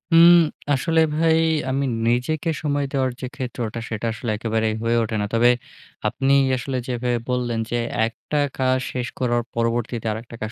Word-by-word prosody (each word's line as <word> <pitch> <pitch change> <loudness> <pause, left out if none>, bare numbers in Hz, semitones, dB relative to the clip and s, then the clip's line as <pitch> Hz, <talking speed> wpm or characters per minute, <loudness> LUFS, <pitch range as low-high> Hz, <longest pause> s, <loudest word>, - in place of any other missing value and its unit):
উম 170 +1 +9 0.4
আসলে 160 +4 +2
ভাই 160 0 +3 0.3
আমি 135 +1 0 0.2
নিজেকে 145 +7 0
সময় 145 -2 0
দেওয়ার 130 -2 +1
যে 130 - -3
ক্ষেত্রটা 120 -3 -4
সেটা 110 0 -4
আসলে 120 0 -5
একেবারেই 110 -1 0
হয়ে 115 0 +2
ওঠে 110 0 -3
না। - - 0
তবে 120 +1 +5 0.6
আপনি 135 +1 +1 0.2
আসলে 130 +1 -3
যেভাবে 125 -1 -1
বললেন 120 -2 -1
যে, 120 - +1 0.3
একটা 150 +5 -4 0.2
কা 130 - +1 0.2
শেষ 125 -2 -3
করার 120 -1 +1
পরবর্তীতে 115 0 -1
আরেকটা 115 +2 -7
কাজ 110 0 -3
125 Hz, 160 wpm, -22 LUFS, 115-135 Hz, 0.6 s, উম